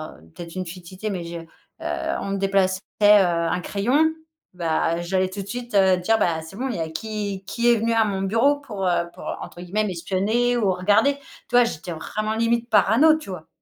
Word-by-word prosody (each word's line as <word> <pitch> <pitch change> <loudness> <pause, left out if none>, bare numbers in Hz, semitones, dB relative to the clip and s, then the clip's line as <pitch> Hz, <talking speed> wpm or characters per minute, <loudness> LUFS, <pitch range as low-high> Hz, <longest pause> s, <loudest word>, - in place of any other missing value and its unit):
un - - -18 0.2
peut-être 170 +1 -9
une 185 0 -3
futilité 185 +4 -7
mais 180 -3 -4
je 170 0 -6
heu, 165 - -12 0.7
on 195 - -4
me 200 - -1
déplaçait, 195 -1 +1 0.2
heu, - - +8
un 175 -4 +4
crayon, 260 - +1 0.4
bah, 165 0 0
j'allais 185 +1 0
tout 200 +1 -6
de - - -14
suite, 240 0 -6
heu, 190 -2 +5
dire: 220 +5 +2
«Bah, 160 -2 +1
c'est 160 +4 -11
bon, 265 +2 -2
il 230 - -3
y - - -4
a 160 0 -2
qui 200 +2 -4
qui 235 +4 +2
est - - +5
venu 230 +1 0
à 225 -1 +3
mon 195 -2 -2
bureau 230 +9 +3
pour, 205 -8 -5
heu, 170 -1 +1
pour, - - -10 0.2
entre 175 - -9
guillemets, 200 +5 -1
"m'espionner" 205 +7 0
ou 200 -5 +2
regarder?» 210 +9 +3 0.3
Tu 245 - -1
vois? 245 - +7
J'étais 175 -5 -5
vraiment, 215 +7 -3
limite, 230 +1 0
parano, 260 +10 +5
tu 305 - -10
vois? 160 -3 -8
195 Hz, 215 wpm, -23 LUFS, 180-225 Hz, 0.7 s, heu